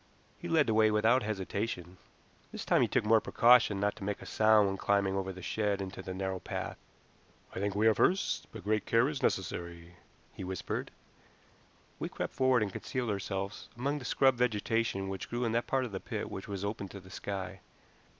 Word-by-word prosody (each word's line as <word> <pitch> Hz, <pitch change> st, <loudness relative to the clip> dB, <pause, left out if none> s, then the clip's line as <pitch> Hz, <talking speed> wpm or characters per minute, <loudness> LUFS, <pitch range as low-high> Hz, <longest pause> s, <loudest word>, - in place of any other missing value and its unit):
He -, -, -6 dB
led 160 Hz, -3 st, +4 dB
the 110 Hz, -, +1 dB
way 110 Hz, 0 st, +5 dB
without 110 Hz, +4 st, +4 dB
hesitation. 100 Hz, -3 st, -3 dB, 0.5 s
This -, -, -6 dB
time -, -, +4 dB
he -, -, +4 dB
took -, -, +1 dB
more 110 Hz, 0 st, +5 dB
precaution 120 Hz, -4 st, +5 dB
not 105 Hz, +1 st, +1 dB
to 105 Hz, -, -8 dB
make 100 Hz, +1 st, -2 dB
a -, -, -10 dB
sound 110 Hz, -1 st, +4 dB
when 95 Hz, -, -1 dB
climbing 100 Hz, -1 st, +1 dB
over 95 Hz, 0 st, -2 dB
the 95 Hz, -1 st, -10 dB
shed 105 Hz, -1 st, 0 dB
into 95 Hz, 0 st, -5 dB
the 95 Hz, -, -6 dB
narrow 95 Hz, 0 st, -3 dB
path. -, -, -5 dB, 0.7 s
"I -, -, -4 dB
think 100 Hz, 0 st, -1 dB
we 105 Hz, +2 st, +2 dB
are 110 Hz, -, +6 dB
first, 185 Hz, -, +1 dB
but 110 Hz, -4 st, -9 dB
great 105 Hz, 0 st, 0 dB
care 115 Hz, +3 st, +4 dB
is 145 Hz, -2 st, -3 dB
necessary," 85 Hz, -2 st, -2 dB, 0.4 s
he -, -, -7 dB
whispered. 95 Hz, 0 st, -4 dB, 1.1 s
We -, -, -3 dB
crept -, -, -4 dB
forward 130 Hz, -3 st, +3 dB
and 100 Hz, -, -3 dB
concealed 125 Hz, -4 st, -3 dB
ourselves 95 Hz, 0 st, -4 dB
among 140 Hz, +4 st, -1 dB
the 125 Hz, -, -9 dB
scrub 135 Hz, -1 st, +3 dB
vegetation 115 Hz, -3 st, 0 dB
which 95 Hz, 0 st, -5 dB
grew 120 Hz, +1 st, -1 dB
in 115 Hz, -, 0 dB
that 120 Hz, +1 st, 0 dB
part 130 Hz, -1 st, +1 dB
of 120 Hz, -, -7 dB
the 95 Hz, -, -4 dB
pit -, -, -5 dB
which 95 Hz, -, -6 dB
was 100 Hz, -1 st, -4 dB
open 100 Hz, -1 st, -3 dB
to 100 Hz, -, -9 dB
the 95 Hz, 0 st, -15 dB
sky. 100 Hz, 0 st, -5 dB
105 Hz, 205 wpm, -31 LUFS, 95-115 Hz, 1.1 s, are